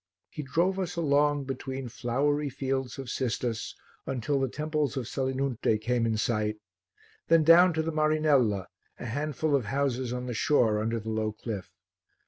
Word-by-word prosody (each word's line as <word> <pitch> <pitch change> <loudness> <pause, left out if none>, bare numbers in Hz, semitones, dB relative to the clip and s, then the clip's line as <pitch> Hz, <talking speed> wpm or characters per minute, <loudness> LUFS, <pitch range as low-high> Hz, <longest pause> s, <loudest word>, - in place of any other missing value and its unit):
He - - -5
drove 170 +7 0
us 180 -2 -3
along 145 -2 +2
between 135 0 -5
flowery 140 +5 0
fields 135 -1 -3
of 135 -2 -6
cistus 120 -2 -2 0.3
until 135 +2 -1
the 135 -1 0
temples 150 -1 -2
of 125 -4 -3
Selinunte 130 -4 0
came 120 +1 0
in 110 -1 0
sight, 105 -1 0 0.7
then 165 -1 +5
down 175 +3 +7
to 160 0 0
the 165 - -2
Marinella, 155 - +2 0.3
a - - -7
handful 145 +4 -1
of 130 -5 0
houses 130 0 -1
on 125 0 -3
the 125 - -3
shore 110 -3 +2
under 115 +1 -1
the 110 +1 -5
low 110 -1 -1
cliff. 105 -3 -6
135 Hz, 160 wpm, -28 LUFS, 115-150 Hz, 0.7 s, down